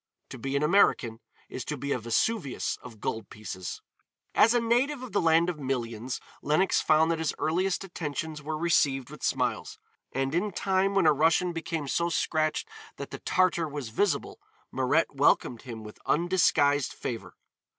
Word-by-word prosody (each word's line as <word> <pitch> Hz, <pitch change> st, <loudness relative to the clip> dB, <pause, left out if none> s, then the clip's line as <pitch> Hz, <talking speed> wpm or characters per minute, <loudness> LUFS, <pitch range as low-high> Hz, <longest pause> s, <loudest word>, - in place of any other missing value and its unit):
To 130 Hz, -, -8 dB
be 135 Hz, +3 st, -3 dB
an 140 Hz, -, +1 dB
American 150 Hz, -, +3 dB, 0.3 s
is 130 Hz, -, -6 dB
to 150 Hz, -, -3 dB
be 140 Hz, +2 st, -4 dB
a 125 Hz, -, +1 dB
Vesuvius 135 Hz, -, 0 dB
of 115 Hz, -4 st, -12 dB
gold 110 Hz, 0 st, -4 dB
pieces. 95 Hz, -3 st, -7 dB, 0.5 s
As 230 Hz, +2 st, +5 dB
a -, -, +5 dB
native 245 Hz, +4 st, +1 dB
of 250 Hz, -, -8 dB
the 200 Hz, -, +1 dB
land 165 Hz, 0 st, +4 dB
of 175 Hz, -4 st, -3 dB
millions, 125 Hz, -2 st, -3 dB, 0.2 s
Lenox 155 Hz, +6 st, +2 dB
found 160 Hz, +1 st, +4 dB
that 165 Hz, -, -1 dB
his 160 Hz, -2 st, -1 dB
earliest 180 Hz, +4 st, 0 dB
attentions 155 Hz, -4 st, -5 dB
were 155 Hz, +1 st, -3 dB
received 145 Hz, -6 st, +1 dB
with -, -, -11 dB
smiles, -, -, -1 dB, 0.3 s
and 135 Hz, +1 st, -1 dB
in 195 Hz, +4 st, 0 dB
time 195 Hz, +1 st, +1 dB
when 195 Hz, -3 st, +4 dB
a 155 Hz, -, +6 dB
Russian 165 Hz, +4 st, +2 dB
became 160 Hz, -2 st, -3 dB
so 170 Hz, +5 st, 0 dB
scratched 155 Hz, -2 st, 0 dB, 0.3 s
that -, -, -7 dB
the -, -, -6 dB
Tartar 180 Hz, -3 st, +2 dB
was 145 Hz, -5 st, -5 dB
visible, 195 Hz, -, -1 dB, 0.3 s
Mirette -, -, +1 dB
welcomed 120 Hz, -, +2 dB
him 115 Hz, -3 st, -8 dB
with 105 Hz, 0 st, -11 dB
undisguised 150 Hz, -5 st, +2 dB
favor. 115 Hz, -3 st, -6 dB
155 Hz, 170 wpm, -28 LUFS, 135-180 Hz, 0.5 s, a